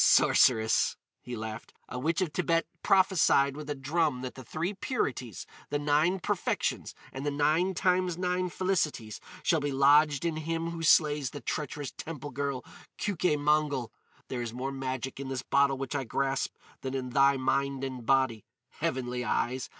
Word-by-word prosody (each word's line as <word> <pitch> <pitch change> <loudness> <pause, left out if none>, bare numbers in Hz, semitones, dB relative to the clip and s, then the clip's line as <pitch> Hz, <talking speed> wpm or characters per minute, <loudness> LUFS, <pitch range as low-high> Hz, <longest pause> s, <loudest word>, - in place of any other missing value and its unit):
"Sorceress," 110 -2 +4 0.2
he 125 - -6
laughed, 110 0 -7
"a 125 - -5
witch 165 +8 0
of 170 -5 -1
Thibet 165 0 +1 0.2
prophesied 180 -8 +4
with 150 0 -8
a 145 - -1
drum 145 -1 0
that 130 - -5
the 130 - -10
three 165 - -3
purities, 130 - -3 0.2
the 145 - 0
nine 150 +6 +2
perfections, - - -1 0.2
and 135 - -5
the 145 - 0
nine 155 +6 +1
times 180 -1 +1
nine 180 0 0
felicities 165 - -1 0.2
shall 165 - +3
be 145 -1 -2
lodged 145 +2 +4
in 165 -2 -1
him 165 +1 -2
who 170 -1 -6
slays 150 -3 +4
the 145 - -8
treacherous 145 -1 -4
temple 150 -2 -7
girl, 140 -1 -3 0.3
Keuke 180 -6 0
Mongol! 145 -4 +1 0.4
There 125 -2 -3
is 115 -1 -4
more 130 +2 -3
magic 130 -1 -4
in 140 - -5
this 130 -2 -3
bottle 140 0 +3
which 135 -1 -4
I 140 -2 -1
grasp 135 +2 -1 0.3
than 135 0 -4
in 130 -1 -3
thy 140 +1 +4
mind 135 +1 0
and 130 -2 -4
body. 130 -3 +2 0.3
Heavenly 125 -1 -2
Eyes! 125 +2 -1
140 Hz, 165 wpm, -29 LUFS, 130-160 Hz, 0.4 s, Sorceress